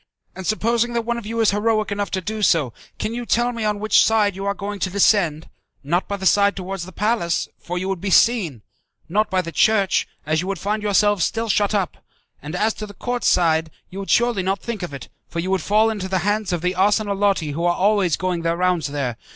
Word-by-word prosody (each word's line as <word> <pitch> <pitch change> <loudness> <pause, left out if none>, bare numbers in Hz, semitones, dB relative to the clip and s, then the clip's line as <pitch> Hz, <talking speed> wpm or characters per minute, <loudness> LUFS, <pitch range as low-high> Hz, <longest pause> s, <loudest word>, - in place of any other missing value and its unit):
And 190 -1 -6
supposing 235 +2 +1
that 235 -1 0
one 235 +1 -2
of 220 - -10
you 230 +1 -1
is 220 - +4
heroic 215 0 0
enough 200 0 -2
to 190 - -2
do 215 +4 -4
so, 155 - +2 0.2
can 220 - -3
you 240 +1 -4
tell 240 +1 +1
me 230 -2 -5
on 210 -1 0
which 215 +1 +4
side 210 -3 +2
you 195 +1 -5
are 200 - 0
going 205 0 -5
to 185 - -1
descend? 180 -5 +2 0.4
Not 170 +6 0
by 200 - -3
the 190 - -6
side 200 +3 +4
towards 190 -1 -5
the - - -10
palace, 210 -5 0
for 180 +1 -5
you 185 +1 -2
would 190 -3 -3
be 195 - -2
seen; 185 - +3 0.4
not 210 +6 +1
by 185 -1 +1
the 170 - -6
church, 200 +4 +2 0.2
as 155 +1 +1
you 180 - -5
would 195 0 -2
find 210 +5 -2
yourselves 205 -2 +2
still 225 0 -1
shut 205 +1 +2
up, 195 -3 -1 0.4
and 150 +3 -6
as 215 +4 +1
to 215 - -7
the 205 - -12
court 245 0 -3
side 160 -2 +2 0.2
you 195 +2 -5
surely 240 -2 +2
would 185 - -1
not 195 +1 0
think 235 -4 -5
of 175 - -5
it, 140 -3 -8 0.2
for - - -9
you 180 +3 -1
would 190 -2 +1
fall 215 +5 +3
into 200 -4 -4
the 190 - +1
hands 205 -1 0
of 175 -2 -1
the 180 0 +1
'arsenalotti' 200 -3 +1
who 165 +4 -3
are 175 0 +2
always 195 -4 +2
going 180 -2 -2
their 165 0 0
rounds 180 -3 +1
there. 140 -5 -3
200 Hz, 240 wpm, -21 LUFS, 175-215 Hz, 0.4 s, is